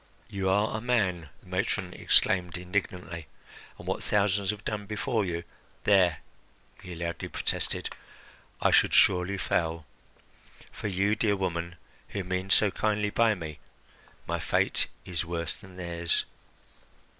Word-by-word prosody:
"You 95 Hz, -1 st, -1 dB
are 105 Hz, +3 st, +2 dB
a 110 Hz, -, -2 dB
man," 95 Hz, -10 st, +1 dB
the -, -, -22 dB
matron 90 Hz, 0 st, -1 dB
exclaimed 90 Hz, -1 st, +3 dB
indignantly, 90 Hz, -3 st, -3 dB, 0.5 s
"and -, -, -11 dB
what -, -, -2 dB
thousands 100 Hz, -1 st, +1 dB
have 105 Hz, 0 st, -3 dB
done 105 Hz, -2 st, -3 dB
before 110 Hz, +2 st, 0 dB
you 85 Hz, -2 st, -2 dB, 0.2 s
" -, -, -32 dB
"There," 90 Hz, -6 st, +4 dB, 0.6 s
he 90 Hz, -, -8 dB
loudly 85 Hz, 0 st, -3 dB
protested, -, -, 0 dB, 0.7 s
"I -, -, +3 dB
should -, -, +5 dB
surely 95 Hz, +1 st, +4 dB
fail; 80 Hz, -3 st, -1 dB, 0.9 s
for, -, -, -5 dB
you 100 Hz, +2 st, +2 dB
dear 105 Hz, -2 st, +2 dB
woman, 85 Hz, -3 st, -2 dB, 0.3 s
who 100 Hz, -, -3 dB
mean 95 Hz, +1 st, -2 dB
so 100 Hz, +1 st, +5 dB
kindly 105 Hz, 0 st, 0 dB
by 115 Hz, -1 st, +4 dB
me, 80 Hz, -5 st, -7 dB, 0.7 s
my -, -, -2 dB
fate -, -, +1 dB, 0.2 s
is 90 Hz, -2 st, -2 dB
worse 85 Hz, -1 st, -2 dB
than 95 Hz, -2 st, -13 dB
theirs. 85 Hz, -2 st, 0 dB
95 Hz, 140 wpm, -29 LUFS, 85-105 Hz, 0.9 s, should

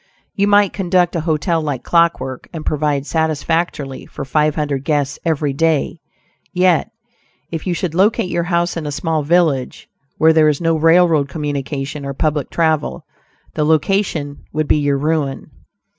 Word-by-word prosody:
You 200 Hz, 0 st, +1 dB
might 205 Hz, -1 st, +4 dB
conduct 180 Hz, -2 st, +1 dB
a 165 Hz, -, 0 dB
hotel 160 Hz, +2 st, +1 dB
like 140 Hz, -5 st, -3 dB
clock 170 Hz, -1 st, +3 dB
work, 130 Hz, -1 st, -7 dB
and 160 Hz, -3 st, -7 dB
provide 145 Hz, -2 st, 0 dB
satisfactorily 160 Hz, -2 st, -2 dB
for -, -, -7 dB
five 150 Hz, +2 st, +1 dB
hundred 145 Hz, -3 st, -2 dB
guests 145 Hz, -1 st, -1 dB
every 150 Hz, -4 st, 0 dB
day; 160 Hz, +2 st, 0 dB, 0.5 s
yet, 180 Hz, +1 st, +2 dB, 0.6 s
if 165 Hz, +2 st, -5 dB
you 175 Hz, -, 0 dB
should 170 Hz, -1 st, -3 dB
locate 195 Hz, +1 st, +2 dB
your 170 Hz, -, -1 dB
house 175 Hz, 0 st, 0 dB
in 160 Hz, -3 st, -4 dB
a -, -, -3 dB
small 155 Hz, +2 st, -1 dB
village 150 Hz, -4 st, 0 dB, 0.3 s
where 160 Hz, +1 st, +5 dB
there 155 Hz, -1 st, +5 dB
is 145 Hz, -, 0 dB
no 165 Hz, -1 st, +1 dB
railroad 165 Hz, -2 st, +4 dB
communication 145 Hz, 0 st, -4 dB
or 140 Hz, 0 st, -5 dB
public 150 Hz, -2 st, -1 dB
travel, 160 Hz, -3 st, 0 dB, 0.5 s
the 155 Hz, -, 0 dB
location 155 Hz, -1 st, 0 dB
would 155 Hz, 0 st, -1 dB
be -, -, +3 dB
your 145 Hz, -1 st, +1 dB
ruin. 150 Hz, -2 st, -2 dB
155 Hz, 160 wpm, -18 LUFS, 145-170 Hz, 0.6 s, where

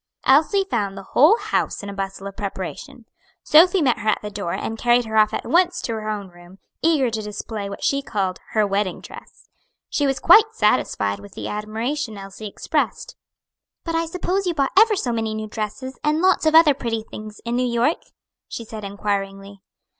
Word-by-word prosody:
Elsie 320 Hz, +9 st, +4 dB
found 200 Hz, -4 st, -1 dB
the 195 Hz, -, -7 dB
whole 310 Hz, -, +6 dB
house -, -, -2 dB
in -, -, -6 dB
a -, -, -6 dB
bustle 195 Hz, 0 st, -5 dB
of 200 Hz, 0 st, -7 dB
preparation. 210 Hz, +6 st, -6 dB, 0.4 s
Sophy 350 Hz, +3 st, +5 dB
met 250 Hz, -5 st, +2 dB
her 215 Hz, 0 st, -1 dB
at -, -, +3 dB
the 210 Hz, -, -5 dB
door 200 Hz, -4 st, -4 dB
and 225 Hz, 0 st, -4 dB
carried 240 Hz, 0 st, +3 dB
her 220 Hz, 0 st, -5 dB
off 215 Hz, -1 st, +5 dB
at -, -, -4 dB
once 355 Hz, +1 st, +2 dB
to 230 Hz, -, -3 dB
her 215 Hz, -1 st, -4 dB
own 205 Hz, -2 st, -4 dB
room, 175 Hz, +1 st, -16 dB, 0.2 s
eager 300 Hz, -7 st, +2 dB
to 220 Hz, -1 st, -2 dB
display 210 Hz, 0 st, -5 dB
what 200 Hz, -, -8 dB
she 275 Hz, 0 st, +1 dB
called 195 Hz, -8 st, -2 dB
"her 215 Hz, -1 st, +3 dB
wedding 195 Hz, -2 st, -1 dB
dress." -, -, -13 dB, 0.4 s
She 290 Hz, -, +1 dB
was 270 Hz, -1 st, 0 dB
quite 435 Hz, +5 st, +6 dB
satisfied 100 Hz, -, +1 dB
with 100 Hz, 0 st, -13 dB
the -, -, -5 dB
admiration 220 Hz, +4 st, -3 dB
Elsie 195 Hz, +2 st, -8 dB
expressed. 200 Hz, -, -2 dB, 0.7 s
"But 330 Hz, -, -4 dB
I 330 Hz, 0 st, 0 dB
suppose 365 Hz, +3 st, -2 dB
you 345 Hz, -, 0 dB
bought 275 Hz, -2 st, +1 dB
ever 440 Hz, -1 st, +6 dB
so 255 Hz, -10 st, -1 dB
many 225 Hz, -2 st, -2 dB
new 215 Hz, 0 st, -4 dB
dresses, 225 Hz, +5 st, -5 dB
and 300 Hz, +1 st, +1 dB
lots 370 Hz, -2 st, +3 dB
of 315 Hz, -, +3 dB
other 320 Hz, -3 st, +7 dB
pretty 230 Hz, -4 st, -3 dB
things, 215 Hz, -1 st, -10 dB
in 235 Hz, +1 st, -1 dB
New 250 Hz, 0 st, +1 dB
York?" 240 Hz, +7 st, +1 dB, 0.5 s
she 230 Hz, -, -7 dB
said 215 Hz, -1 st, -8 dB
inquiringly. 200 Hz, -1 st, -4 dB
225 Hz, 200 wpm, -22 LUFS, 200-295 Hz, 0.7 s, other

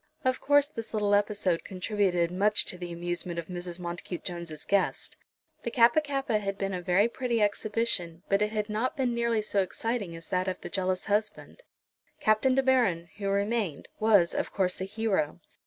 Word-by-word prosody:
Of 255 Hz, 0 st, +1 dB
course 285 Hz, 0 st, +4 dB
this 230 Hz, -6 st, -7 dB
little 205 Hz, -1 st, +2 dB
episode 205 Hz, -4 st, +1 dB
contributed 185 Hz, -3 st, 0 dB
much 205 Hz, +3 st, +2 dB
to 180 Hz, -, -3 dB
the 175 Hz, -1 st, -5 dB
amusement 175 Hz, 0 st, -4 dB
of 170 Hz, 0 st, -5 dB
Mrs. 175 Hz, -1 st, -6 dB
Montacute 175 Hz, 0 st, -5 dB
Jones's 170 Hz, -4 st, -6 dB
guests. 200 Hz, -1 st, 0 dB, 0.5 s
The -, -, -3 dB
Kappa 240 Hz, +5 st, +5 dB
kappa 275 Hz, -6 st, -1 dB
had 195 Hz, -1 st, -3 dB
been 195 Hz, -1 st, -2 dB
a 180 Hz, -, -3 dB
very 185 Hz, +4 st, +3 dB
pretty 240 Hz, -1 st, -1 dB
exhibition, 205 Hz, -5 st, 0 dB
but 195 Hz, +1 st, +2 dB
it 210 Hz, 0 st, +1 dB
had 210 Hz, -1 st, -1 dB
not 225 Hz, +7 st, -1 dB
been 255 Hz, -3 st, +1 dB
nearly 235 Hz, -2 st, +1 dB
so 205 Hz, -1 st, +1 dB
exciting 200 Hz, -1 st, -2 dB
as 165 Hz, 0 st, -11 dB
that 185 Hz, 0 st, 0 dB
of 185 Hz, -, -2 dB
the -, -, -6 dB
jealous 185 Hz, -1 st, -1 dB
husband. 210 Hz, -, -2 dB, 0.6 s
Captain 215 Hz, +5 st, +3 dB
De 270 Hz, -, +3 dB
Baron, 200 Hz, -11 st, +2 dB
who 200 Hz, -1 st, -2 dB
remained, 200 Hz, -5 st, -1 dB
was, 205 Hz, -6 st, +4 dB
of -, -, -2 dB
course, 185 Hz, -2 st, 0 dB
a -, -, -1 dB
hero. 195 Hz, -7 st, -1 dB
200 Hz, 185 wpm, -28 LUFS, 180-225 Hz, 0.6 s, Kappa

